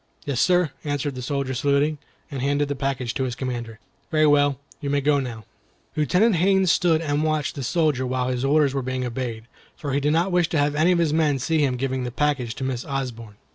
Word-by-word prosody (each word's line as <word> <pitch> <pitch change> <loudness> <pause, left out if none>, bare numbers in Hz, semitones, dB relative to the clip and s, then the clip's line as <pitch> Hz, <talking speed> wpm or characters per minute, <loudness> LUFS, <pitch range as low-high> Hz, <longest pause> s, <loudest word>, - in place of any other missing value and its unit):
"Yes, 135 -3 0
sir," 180 -4 +3
answered 145 -1 -2
the 130 - -6
soldier, 135 +1 -2
saluting, 145 +3 +1 0.3
and 135 -2 -4
handing 145 +2 +1
the 145 - -1
package 135 -3 -2
to 130 - -1
his 125 -2 -3
commander. 120 -4 -5 0.3
"Very 155 -2 +3
well, 145 -2 +3 0.2
you 145 - -4
may 145 0 +2
go 145 +1 +2
now." 115 -5 -6 0.5
Lieutenant 180 - +3
Haines 190 0 +3
stood 165 -3 +3
and 145 -1 0
watched 155 -2 0
the 140 - -6
soldiers 150 -2 +1
while 125 0 -1
his 125 0 -2
order 140 0 +3
was 135 - -1
being 130 0 -2
obeyed, 120 -2 -4 0.3
for 140 -3 -4
he 140 - +2
did 145 +1 +1
not 170 +4 +1
wish 175 -1 +2
to 160 - 0
have 145 0 +2
any 155 +4 +3
of 180 - +3
his 165 -3 +1
men 155 -3 +2
see 160 +5 0
him 130 -3 0
give 135 +1 -2
the 125 - -3
package 130 -3 -1
to - - -5
Miss 130 -2 -2
Osborne. 120 -6 -5
140 Hz, 225 wpm, -23 LUFS, 130-155 Hz, 0.5 s, sir